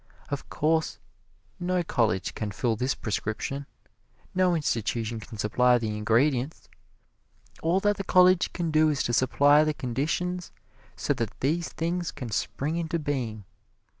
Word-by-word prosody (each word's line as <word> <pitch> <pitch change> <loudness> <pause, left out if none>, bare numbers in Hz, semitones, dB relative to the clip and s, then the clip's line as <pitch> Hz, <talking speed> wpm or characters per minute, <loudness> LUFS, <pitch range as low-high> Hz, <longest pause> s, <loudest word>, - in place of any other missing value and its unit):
Of 140 -1 -4
course 160 +1 0 0.6
no 180 0 0
college 110 - 0
can 105 - -3
fill 110 +3 0
this 125 +4 -1
prescription 110 +6 -3 0.7
no 185 -1 +3
institution 115 -5 -1
can 110 0 -10
supply 125 +4 +3
the 110 -3 -2
ingredients 125 +6 +1 0.9
all 170 +4 +2
that 205 0 +2
the 195 - -3
college 185 -1 +5
can 170 -3 -2
do 155 0 +4
is 145 -2 0
to 120 - -1
supply 145 +4 +5
the 155 -1 0
conditions 160 +9 -2 0.4
so - - 0
that 115 -3 -4
these 160 +5 0
things 170 +1 -2
can 125 -5 -7
spring 150 +9 -2
into 170 0 -1
being. 125 -9 -3
140 Hz, 140 wpm, -27 LUFS, 115-165 Hz, 0.9 s, college